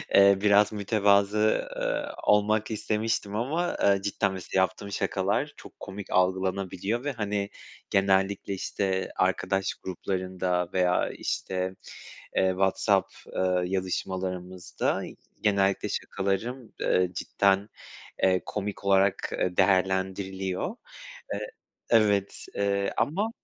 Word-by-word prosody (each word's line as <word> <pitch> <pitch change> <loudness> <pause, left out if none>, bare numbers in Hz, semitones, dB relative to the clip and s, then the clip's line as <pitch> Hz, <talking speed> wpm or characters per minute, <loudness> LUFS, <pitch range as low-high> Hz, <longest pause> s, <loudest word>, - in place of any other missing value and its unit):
eee, 100 0 +7
biraz 105 0 +5
mütevazı, 105 0 +2
ııı, - - -1 0.2
olmak 105 +1 +3
istemiştim 110 -1 -1
ama, 155 +10 -1
eee, 100 -1 +4
cidden 100 0 0
mesela 95 0 -1
yaptığım 95 +2 -2
şakalar 100 +10 0
çok - - -14
komik 95 0 -8
algılanabiliyor 95 +4 0
ve, 145 - -1
hani, 105 -4 -2 0.4
genellikle, 95 0 +2
işte, 95 0 -2
arkadaş 95 +1 +1
gruplarında 90 -1 -2
veya, 90 -1 +2
işte, 95 0 -3 0.6
eee, 95 0 +3
WhatsApp, 95 +1 +2 0.2
eee, 90 -1 +2
yazışmalarımızda 90 -1 -2 0.4
genellikle 100 -2 +2
şakalarım, 110 +5 -2
eee, 90 -1 +2
cidden, 100 +2 +1 0.5
eee, 95 -1 +3
komik 105 -1 -4
olarak, 100 0 +3
eee, 90 -1 -1
değerlendiriliyor, 95 - +1 0.6
eee - - -3 0.5
Evet, 105 -3 +3
eee, 100 0 0
ama 205 +9 0
95 Hz, 100 wpm, -27 LUFS, 95-105 Hz, 0.6 s, eee